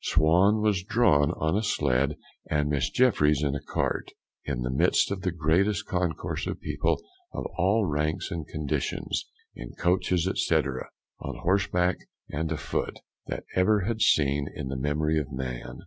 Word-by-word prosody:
Swan 90 Hz, +7 st, +3 dB
was 105 Hz, -4 st, +2 dB
drawn 95 Hz, -9 st, +3 dB
on 80 Hz, -1 st, 0 dB
a 105 Hz, -, +2 dB
sledge, 70 Hz, -, +1 dB, 0.3 s
and 75 Hz, -1 st, +1 dB
Miss 70 Hz, -4 st, +1 dB
Jeffryes 75 Hz, -, +3 dB
in 70 Hz, -2 st, +1 dB
a 70 Hz, -, -3 dB
cart, -, -, -2 dB, 0.4 s
in -, -, -2 dB
the 65 Hz, -, -2 dB
midst 65 Hz, -, +3 dB
of 100 Hz, -2 st, -3 dB
the 95 Hz, -, 0 dB
greatest 90 Hz, +4 st, +1 dB
concourse 90 Hz, -4 st, -2 dB
of -, -, -4 dB
people -, -, -1 dB, 0.3 s
of -, -, -4 dB
all 100 Hz, +4 st, +2 dB
ranks 75 Hz, 0 st, -1 dB
and 80 Hz, -4 st, -4 dB
conditions, 75 Hz, -2 st, -2 dB, 0.3 s
in -, -, -9 dB
coaches, 90 Hz, 0 st, +1 dB, 0.2 s
&c., -, -, +3 dB
on 65 Hz, -1 st, -4 dB
horseback 90 Hz, -1 st, +2 dB, 0.3 s
and 80 Hz, +2 st, -2 dB
a 80 Hz, -, -1 dB
foot, 70 Hz, -, -3 dB, 0.3 s
that -, -, -4 dB
ever 100 Hz, +3 st, +4 dB
had 110 Hz, +4 st, -1 dB
been -, -, -13 dB
seen 70 Hz, -9 st, +3 dB
in 65 Hz, -, -5 dB
the 70 Hz, -, -3 dB
memory 75 Hz, +3 st, 0 dB
of 75 Hz, -, -5 dB
man. 65 Hz, -2 st, -5 dB
80 Hz, 165 wpm, -27 LUFS, 70-95 Hz, 0.4 s, ever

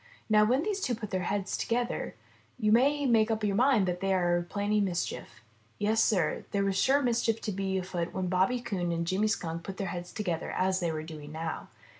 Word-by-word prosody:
Now 210 Hz, 0 st, +6 dB
when 255 Hz, +7 st, +2 dB
these 405 Hz, -1 st, -2 dB
two 245 Hz, -, 0 dB
put 215 Hz, -2 st, -7 dB
their 185 Hz, -, 0 dB
heads 200 Hz, -1 st, -1 dB
to -, -, -3 dB
gether, 240 Hz, +1 st, -1 dB, 0.4 s
you 215 Hz, -4 st, +1 dB
may 280 Hz, +5 st, +4 dB
make 225 Hz, -3 st, +4 dB
up 220 Hz, -1 st, -1 dB
your 200 Hz, -2 st, +1 dB
mind 240 Hz, -4 st, +4 dB
that 180 Hz, 0 st, -1 dB
they 195 Hz, 0 st, +1 dB
are 175 Hz, -1 st, +1 dB
planning 205 Hz, +1 st, +1 dB
mischief. 180 Hz, -9 st, -3 dB, 0.4 s
Yes, 220 Hz, +2 st, +2 dB
Sir, 180 Hz, -8 st, +1 dB
there 200 Hz, -1 st, 0 dB
is 195 Hz, -, 0 dB
sure 260 Hz, +8 st, +3 dB
to 285 Hz, -, +3 dB
be -, -, +2 dB, 0.7 s
mischief 185 Hz, -1 st, -1 dB
afoot 175 Hz, -2 st, -3 dB
when 190 Hz, -, -2 dB
Bobby 185 Hz, +7 st, +2 dB
Coon 185 Hz, -7 st, -2 dB
and 170 Hz, 0 st, -1 dB
Jimmy 190 Hz, +5 st, +1 dB
Skunk 170 Hz, -6 st, -2 dB
put 190 Hz, +3 st, -7 dB
their 195 Hz, -, -3 dB
heads 175 Hz, -1 st, -6 dB
together 175 Hz, -6 st, -3 dB
as 185 Hz, 0 st, +1 dB
they 170 Hz, -3 st, 0 dB
were 155 Hz, -1 st, -4 dB
doing 155 Hz, -2 st, -9 dB
now. 160 Hz, +1 st, -4 dB
195 Hz, 220 wpm, -29 LUFS, 175-220 Hz, 0.7 s, Now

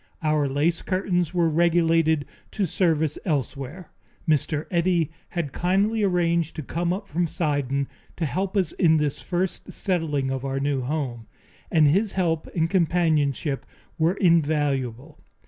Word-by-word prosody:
Our 155 Hz, -2 st, +2 dB
lace 150 Hz, +5 st, +1 dB
curtains 180 Hz, -3 st, 0 dB
were 175 Hz, -2 st, +2 dB
relegated 165 Hz, -2 st, +3 dB, 0.3 s
to 200 Hz, -, 0 dB
service 160 Hz, -4 st, +1 dB
elsewhere. 145 Hz, -, -3 dB, 0.4 s
Mr. 155 Hz, 0 st, +1 dB
Eddy 170 Hz, -3 st, +2 dB, 0.3 s
had 150 Hz, -5 st, -2 dB
kindly 200 Hz, +5 st, +1 dB
arranged 170 Hz, -4 st, +1 dB
to 155 Hz, -, -5 dB
come 170 Hz, +5 st, -1 dB
up 200 Hz, +2 st, -3 dB
from 170 Hz, +3 st, 0 dB
Sidon 140 Hz, -4 st, -1 dB, 0.3 s
to 170 Hz, -, -1 dB
help 190 Hz, +6 st, -2 dB
us 185 Hz, -5 st, +1 dB
in 160 Hz, -4 st, +3 dB
this 150 Hz, -2 st, -1 dB
first 180 Hz, +1 st, -2 dB
settling 150 Hz, -8 st, -1 dB
of 135 Hz, -1 st, -3 dB
our 135 Hz, 0 st, -2 dB
new 140 Hz, -1 st, 0 dB
home, 125 Hz, -4 st, -3 dB, 0.4 s
and 155 Hz, -2 st, +5 dB
his 195 Hz, +8 st, +2 dB
help 165 Hz, -4 st, 0 dB
and 165 Hz, -2 st, +2 dB
companionship 160 Hz, -6 st, +1 dB, 0.4 s
were 165 Hz, +4 st, +3 dB
invaluable. 145 Hz, -, +1 dB
160 Hz, 140 wpm, -24 LUFS, 145-175 Hz, 0.4 s, and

